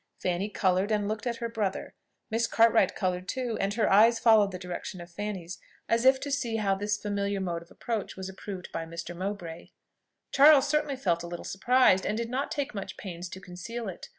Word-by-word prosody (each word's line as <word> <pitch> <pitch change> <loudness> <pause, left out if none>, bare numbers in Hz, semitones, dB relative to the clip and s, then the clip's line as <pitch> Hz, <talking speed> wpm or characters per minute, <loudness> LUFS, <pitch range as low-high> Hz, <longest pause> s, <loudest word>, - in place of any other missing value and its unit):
Fanny 180 +3 -1
coloured, 190 0 +1
and 210 -2 +1
looked 215 +3 -3
at 235 - -1
her 235 0 -3
brother. 210 -4 -3 0.4
Miss 230 +1 +1
Cartwright 230 0 +4
coloured 185 -1 -2
too; 245 -1 -2
and 200 +1 -1
her 225 -2 +2
eyes 225 +4 +6
followed 220 -4 +5
the 180 - -5
direction 180 0 -6
of 175 +1 -10
Fanny's, 185 -2 -5 0.3
as 230 +2 +1
if 265 0 +6
to 285 - -4
see 245 -5 -1
how 205 -3 +1
this 205 +2 -1
familiar 200 -1 -2
mode 175 -3 -2
of 170 - -16
approach 225 -4 -4
was 190 0 -6
approved 190 -1 -8
by 165 - -3
Mr. 170 +1 -7
Mowbray. 180 -3 -5 0.6
Charles 285 0 +7
certainly 300 -1 0
felt 175 -9 0
a 170 - -6
little 175 0 -7
surprised, 220 -2 +3
and 215 - -1
did 230 0 -3
not 270 +3 -1
take 285 -2 -3
much 195 -2 -6
pains 175 -2 -7
to 190 - -8
conceal 190 +6 -7
it. 185 - -8
205 Hz, 205 wpm, -28 LUFS, 185-230 Hz, 0.6 s, Charles